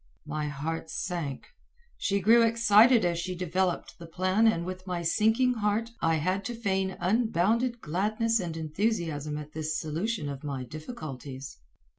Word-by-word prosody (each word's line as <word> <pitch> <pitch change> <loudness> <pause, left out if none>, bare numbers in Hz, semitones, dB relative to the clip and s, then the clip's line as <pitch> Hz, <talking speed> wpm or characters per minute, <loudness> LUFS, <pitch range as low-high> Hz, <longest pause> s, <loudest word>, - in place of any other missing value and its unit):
My 155 0 -3
heart 160 +3 -4
sank. 170 -8 -4 0.5
She 200 -1 0
grew 230 +5 +6
excited 230 0 +5
as 170 -1 0
she 185 +1 -3
developed 180 +1 -1
the 170 - -9
plan 185 +6 +2
and 170 -6 +2
with 185 +1 -6
my 175 -1 -2
sinking 225 +8 +3
heart 220 +1 0
I 165 0 +3
had 185 +5 0
to 240 - -3
feign 190 -4 -1
unbounded 225 +4 +1
gladness 215 +7 0
and 170 -4 -4
enthusiasm 160 -3 -1
at 150 0 -8
this 155 0 -2
solution 165 +3 -2
of 140 0 -6
my 140 -3 -3
difficulties. 140 - -8
180 Hz, 150 wpm, -28 LUFS, 155-220 Hz, 0.5 s, grew